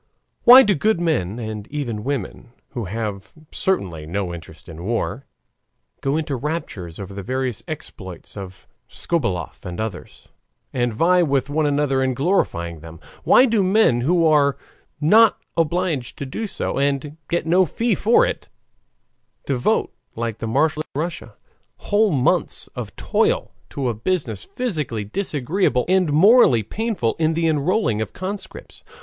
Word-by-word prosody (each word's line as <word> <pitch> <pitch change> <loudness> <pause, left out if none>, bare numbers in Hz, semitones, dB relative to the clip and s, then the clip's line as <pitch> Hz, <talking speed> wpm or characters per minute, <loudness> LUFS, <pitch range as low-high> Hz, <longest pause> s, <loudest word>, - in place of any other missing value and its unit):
Why 255 +2 +11
do 210 - +3
good 210 +4 +1
men 125 - 0
and 110 -2 -6
even 120 -8 -4
women, 125 -3 -4 0.2
who 120 -5 -5
have 105 0 -5 0.2
certainly 90 - -2
no 90 +1 -3
interest 80 -1 -11
in 80 0 -9
war, 120 +5 -2 0.7
go 140 +2 0
into 155 -3 -2
raptures 125 - -5
over 100 0 -7
the 100 - -6
various 130 +2 -2
exploits 95 - -8
of 95 -2 -9 0.2
Skobeloff 120 - -3
and 90 +1 -6
others, 110 -4 -6 0.4
and 120 -2 0
vie 175 +10 +3
with 140 -3 0
one 155 0 +1
another 140 -2 +1
in 130 -1 0
glorifying 85 - 0
them? 80 +1 -11 0.2
Why 255 - +6
do 225 -4 +2
men, 190 - +3
who 165 +5 +2
are 145 -3 +4 0.4
not 215 +9 +5 0.2
obliged 165 -5 -1
to 140 - -5
do 215 +12 -4
so, 190 - -3
and 140 +1 -1
get 170 -1 0
no 180 +2 +4
fee 230 - 0
for 220 +5 +4
it, - - -4 1.0
devote, 130 -3 0 0.2
like 115 -1 -3
the 115 - -4
marshals 150 +6 +1
of - - -37
nobility - - -3
in - - 0 0.3
Russia, - - -21 0.5
whole 210 0 +4
months 135 -5 +1
of - - -7
toil - - 0 0.2
to 135 -2 -3
a 120 - 0
business 115 - -2
physically 155 - -3
disagreeable 145 - 0
and 185 -3 +2
morally 160 - +6
painful 210 - -2
the 165 +1 +1
enrolling 155 - +1
of 110 - -4
conscripts? 190 0 -7
140 Hz, 150 wpm, -21 LUFS, 110-175 Hz, 1.0 s, Why